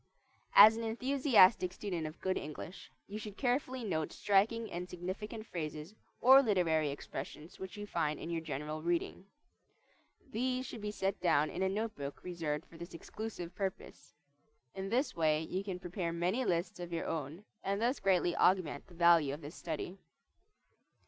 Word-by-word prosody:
As 215 +2 +10
an 230 - -3
enthusiastic 230 -5 +4
student 180 -5 -3
of 155 - -10
good 190 0 0
English, 155 +5 -7 0.2
you 210 +2 -6
should 210 -2 -8
carefully 255 -1 0
note 160 -7 -1
striking 215 +2 +2
and 180 +1 -5
significant 205 +5 -5
phrases 155 -1 -5 0.3
or 265 +2 +9
literary 170 - +2
expressions 150 +2 -7
which 190 +1 -7
you 205 - -5
find 155 -6 -1
in 170 - -5
your 165 -1 -1
general 150 0 -4
reading. 175 +3 -1 1.0
These 255 +3 -1
should 230 - -7
be 210 - -3
set 195 -1 -2
down 155 -4 +3
in - - -4
a 190 - +2
note 215 +3 -2
book 140 0 -7
reserved 165 -4 -3
for 165 - -15
this 170 0 -8
exclusive 180 -2 -6
purpose. 190 0 -5 0.6
In 195 0 -4
this 255 +6 +1
way 155 -1 +2
you 185 +4 -3
can 190 -3 -4
prepare 175 -1 -3
many 180 +9 0
lists 175 -1 -1
of 175 -1 -6
your 170 - -2
own, 160 +5 -4 0.2
and 200 +1 0
thus 245 +4 +1
greatly 180 -2 +2
augment 180 -5 +2
the 180 - -15
value 165 -5 +5
of 150 - -12
this 145 +2 -8
study. 175 +3 -5
180 Hz, 170 wpm, -34 LUFS, 165-210 Hz, 1.0 s, As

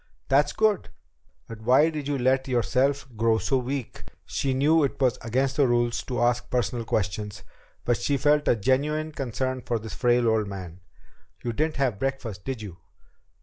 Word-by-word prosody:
"That's 145 +2 +4
good. 215 -3 +1 0.6
But 115 -1 -9
why 130 +8 +4
did 150 -3 -5
you 145 -1 0
let 130 +1 +2
yourself 130 +3 +1
grow 115 0 +2
so 135 +4 +1
weak?" 130 0 -5 0.2
She 135 - -1
knew 150 +4 +4
it 140 - -1
was 130 -2 +2
against 130 +4 0
the 140 -3 +4
rules 120 -1 +1
to 125 -2 -2
ask 120 0 +1
personal 120 -1 -1
questions, 105 -1 -2 0.4
but 120 -1 +2
she 145 - 0
felt 145 +2 +2
a - - +5
genuine 145 +7 0
concern 130 -2 -3
for 120 - -1
this 110 -2 -7
frail 120 -1 +2
old 110 -2 +2
man. 90 -3 -7 0.6
"You 120 - -2
didn't 155 +6 0
have 125 -8 0
breakfast, 120 -8 -3
did 130 -5 -4
you?" 95 -5 -8
125 Hz, 175 wpm, -26 LUFS, 115-140 Hz, 0.6 s, a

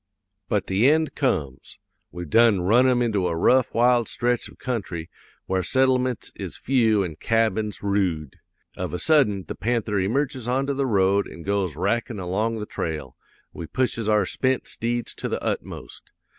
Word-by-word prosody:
"'But 100 -2 0
the 100 +8 +3
end 155 +1 +2
comes. 75 - -2 0.3
We've 90 -1 -7
done 115 +1 +4
run 115 +8 +4
him 125 -1 +3
into 105 -6 0
a 85 - -1
rough, 125 +9 +3
wild 120 0 +3
stretch 120 0 -1
of - - -17
country 95 -10 -4 0.3
where 95 0 0
settlements 130 +3 +1
is - - -5
few 115 -6 +2
an' 80 -4 -6
cabins 110 -2 0
roode. 90 -8 -1 0.4
Of 85 - -4
a - - -1
sudden, 105 - +3
the - - -4
panther 110 -3 -1
emerges 130 +5 -1
onto 135 +3 0
the 135 0 -1
road 100 -2 +2
an' 85 - -10
goes 95 -5 -1
rackin' 110 - -1
along 105 +5 -1
the 105 - -4
trail. 75 -10 -5 0.4
We 80 - -7
pushes 115 -2 -1
our 105 -2 +3
spent 130 +6 -1
steeds 120 0 -2
to - - -5
the - - -3
utmost. - - -5
110 Hz, 165 wpm, -24 LUFS, 95-125 Hz, 0.4 s, done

